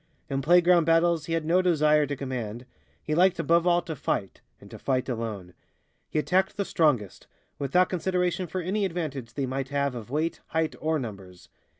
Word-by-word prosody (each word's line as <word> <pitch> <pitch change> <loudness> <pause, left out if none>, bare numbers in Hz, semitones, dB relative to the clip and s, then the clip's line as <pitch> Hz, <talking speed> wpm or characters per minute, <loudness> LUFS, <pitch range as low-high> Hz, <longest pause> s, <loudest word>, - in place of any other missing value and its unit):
In 135 0 0
playground 175 +2 +5
battles 165 -1 +2
he 165 - -2
had 165 -1 -1
no 175 +3 +3
desire 150 -4 +3
to 145 - -3
command; 125 -3 -5 0.4
he 155 - -2
liked 180 +3 +4
above 170 +1 +2
all 175 0 +3
to 165 -3 -5
fight, 100 -7 -3 0.2
and - - -15
to - - -9
fight 130 -2 -1
alone. 110 -7 -5 0.6
He - - -3
attacked 190 +5 +1
the 200 - -1
strongest, 135 - 0 0.3
without 180 +7 +2
consideration 180 0 -1
for 185 +3 -3
any 195 +4 -1
advantage 145 -10 -4
they 140 - -1
might 135 +1 -3
have 140 -1 0
of 120 -2 -8
weight, 155 +5 -1
height 160 -1 -1
or 160 +1 0
numbers. 100 -8 -8
155 Hz, 185 wpm, -27 LUFS, 130-175 Hz, 0.6 s, playground